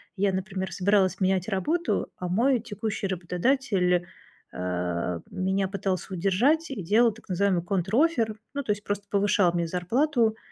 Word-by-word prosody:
я, 195 -1 +1
например, 190 0 -3
собиралась 195 0 +2
менять 185 0 +1
работу, 305 - 0
а 180 - -4
мой 240 +8 +2
текущий 215 -2 -4
работодатель, 180 0 +1 0.4
а, 90 -1 -2
меня 190 0 0
пытался 190 -1 -3
удержать 240 - +2
и 230 - -4
делал 220 +6 +4
так 220 0 -17
называемый 185 -1 +1
контроффер- 220 - +1 0.2
ну, 285 - -2
то 215 - -1
есть 210 0 -3
просто 205 0 -3
повышал 200 -3 +3
мне 170 -1 0
зарплату 225 - +1
195 Hz, 145 wpm, -26 LUFS, 180-225 Hz, 0.4 s, делал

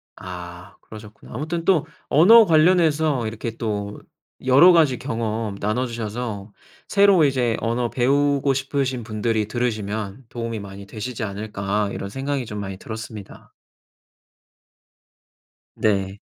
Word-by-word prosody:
아 90 0 -9
그러셨구나. 110 -1 -13
아무튼 160 +6 -3
또 175 -5 +3 0.2
언어 220 +9 +7
관련해서 155 - +3
이렇게 115 +1 -5
또 105 -2 -3 0.5
여러 140 +8 +7
가지 155 -7 +4
경험 110 -2 -3
나눠주셔서 110 -2 -3 0.4
새로 200 -4 +5
이제 125 -4 +1
언어 120 +2 -1
배우고 140 +2 +2
싶으신 135 -2 -2
분들이 110 0 -1
들으시면 110 -1 -3
도움이 115 -2 -4
많이 100 0 -9
되시지 110 +2 -5
않을까 100 0 -2
이런 100 - -5
생각이 135 +2 -3
좀 105 -2 -6
많이 95 -1 -5
들었습니다. 110 -1 -9 2.2
네. 100 -2 0
115 Hz, 275 characters per minute, -22 LUFS, 105-135 Hz, 2.2 s, 언어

